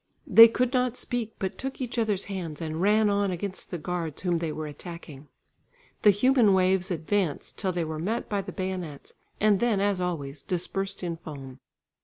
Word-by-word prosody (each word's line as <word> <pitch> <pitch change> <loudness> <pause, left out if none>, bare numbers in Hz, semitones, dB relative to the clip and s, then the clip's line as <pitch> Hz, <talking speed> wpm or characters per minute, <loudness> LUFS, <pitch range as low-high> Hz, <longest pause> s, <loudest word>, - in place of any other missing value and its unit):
They 230 0 +10
could 245 +2 0
not 250 -1 +1
speak, 235 -3 -3
but 190 -1 -4
took 270 0 -4
each 245 -2 -3
other's 210 -4 0
hands 175 -6 -5
and 160 0 -4
ran 210 +2 +4
on 200 -1 +1
against 185 +1 -4
the 175 - -4
guards 165 -1 -4
whom 175 -2 +1
they 165 -2 -2
were 155 +1 -5
attacking. 150 -1 -9 0.7
The 210 - +7
human 215 0 +4
waves 185 0 +2
advanced 175 -1 -2
till 190 -3 0
they 175 -2 -1
were 155 0 -4
met 220 +8 -2
by 205 -2 -1
the - - -7
bayonets, 185 -6 -5 0.3
and 210 -2 +4
then 230 -3 +2
as 200 -2 +1
always, 150 -6 -3
dispersed 190 +3 -3
in 170 -2 -3
foam. 135 -5 -9
185 Hz, 185 wpm, -27 LUFS, 165-210 Hz, 0.7 s, They